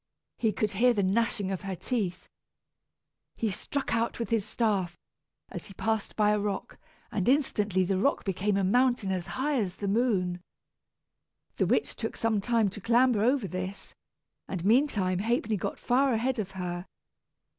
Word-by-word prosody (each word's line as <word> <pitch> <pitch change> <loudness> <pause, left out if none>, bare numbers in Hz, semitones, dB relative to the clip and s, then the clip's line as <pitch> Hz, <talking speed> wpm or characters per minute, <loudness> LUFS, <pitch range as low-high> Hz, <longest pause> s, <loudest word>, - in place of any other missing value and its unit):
He 220 -2 +2
could 210 0 -1
hear 240 +4 +3
the 200 - +1
gnashing 200 0 +1
of 190 - -3
her 195 -1 -4
teeth. 190 -4 -3 1.1
He 220 -3 -1
struck 280 +8 -3
out 230 0 0
with 230 0 -4
his 225 -3 +2
staff, 200 -5 -1 0.5
as - - -7
he 195 - -13
passed 220 0 -1
by 210 -1 +3
a 210 - +2
rock, 205 -1 -4 0.3
and 195 +2 0
instantly 210 -9 +2
the 185 +1 0
rock 280 +8 +1
became 195 +1 0
a 200 - +1
mountain 240 0 +2
as 185 -1 -2
high 270 +10 -1
as 185 -3 -3
the 200 - -4
moon. 195 -5 +1 1.2
The - - +2
witch - - +1
took - - -4
some 225 -3 +1
time 230 0 +2
to 200 +2 -9
clamber 235 0 +3
over 250 -1 +2
this, 185 +2 -6 0.5
and 180 -2 -4
meantime 210 -6 +3
Ha'penny 230 +2 0
got 190 - -3
far 260 +1 +2
ahead 245 +2 0
of 200 -3 -2
her. 175 0 -4
210 Hz, 165 wpm, -29 LUFS, 190-235 Hz, 1.2 s, hear